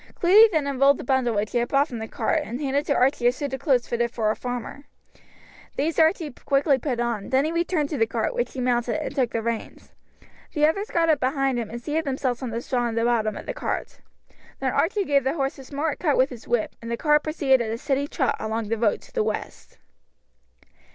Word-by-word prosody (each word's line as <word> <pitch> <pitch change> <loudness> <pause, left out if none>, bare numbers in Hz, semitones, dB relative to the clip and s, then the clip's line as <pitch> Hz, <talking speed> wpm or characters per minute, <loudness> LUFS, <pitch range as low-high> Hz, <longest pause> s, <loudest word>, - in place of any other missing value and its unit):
Cluny 415 +6 +7
then 310 -5 +1
unrolled 275 0 +3
the - - -7
bundle 250 -3 +1
which 205 +1 -1
he 240 - +1
had 240 - 0
brought 280 +3 +2
from 235 - -5
the 220 - -5
cart, - - 0
and 240 +4 -6
handed 285 0 -1
to - - +2
Archie 255 -1 +2
a - - +5
suit 275 +1 -5
of 265 - -3
clothes 260 -6 +2
fitted 235 0 0
for 220 -2 0
a - - -2
farmer. 245 +3 -6 0.9
These 310 +4 -1
Archie 320 -1 +3
quickly 275 +2 +1
put 250 -2 -2
on, 235 -4 -2
then 265 +2 +3
he 315 - -1
returned 335 -3 0
to 295 - -2
the 225 - +3
cart, 225 -1 -1
which 240 0 -2
he 260 - -4
mounted, 245 +2 0
and 310 - -4
took 255 -4 +1
the 230 -1 -3
reins. 230 -1 -5 0.6
The 300 0 +3
others 395 +8 0
got 330 -1 +1
up 305 -3 +3
behind 270 -1 0
him 225 -3 -4
and 235 - -6
seated 305 +6 -2
themselves 260 -2 -2
on 255 - -3
the 230 +1 -3
straw 245 -1 -1
in 225 - -4
the 230 - +1
bottom 225 -3 +1
of - - -8
the - - -4
cart. - - -4 0.6
Then - - -1
Archie 410 -2 +1
gave 280 -3 +2
the 270 +4 0
horse 275 -1 -2
a - - -9
smart 290 +3 -3
cut 300 -5 +1
with 260 +2 +3
his 240 -3 -10
whip, 240 -2 0
and 230 - -7
the 235 - -2
cart 300 +2 +3
proceeded 285 -5 +2
at 225 - -2
a 225 - -2
steady 275 +3 -1
trot 270 -3 0
along 220 0 -3
the 230 -1 -1
road 215 -3 +1
to - - -18
the 460 - +1
west. - - -5
265 Hz, 245 wpm, -24 LUFS, 235-295 Hz, 0.9 s, Cluny